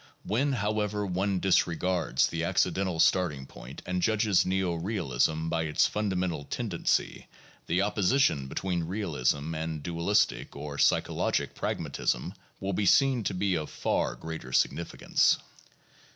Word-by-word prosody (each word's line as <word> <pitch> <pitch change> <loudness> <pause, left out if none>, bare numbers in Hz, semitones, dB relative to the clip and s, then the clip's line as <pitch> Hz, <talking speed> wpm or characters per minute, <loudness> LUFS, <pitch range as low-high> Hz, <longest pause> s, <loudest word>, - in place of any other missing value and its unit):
When, 135 +7 0
how 105 -2 0
ever, 105 0 -1
one 95 +1 0
disregards 90 -1 +2
the 80 0 -3
accidental 95 0 0
starting 80 -7 +2
point - - -11
and 90 0 -2
judges 105 -2 +2
neo 95 -1 0
realism 80 - -1
by 80 0 0
its 75 - +2
fundamental 95 -7 -1
tendency, 105 - -1 0.4
the 90 +4 +2
opposition 105 - +2
between 90 +3 -2
realism 80 -5 -1
and 80 -1 -4
dualistic 90 +5 0
or 70 -1 -6
psychologic - - +1
pragmatism 65 +9 -2 0.3
will 95 0 -2
be 100 +2 0
seen 135 +1 +4
to 95 - -1
be 95 +1 +1
of 80 -3 -2
far - - -1
greater 80 -5 -7
significance. 85 +6 +2
90 Hz, 130 wpm, -28 LUFS, 80-100 Hz, 0.4 s, seen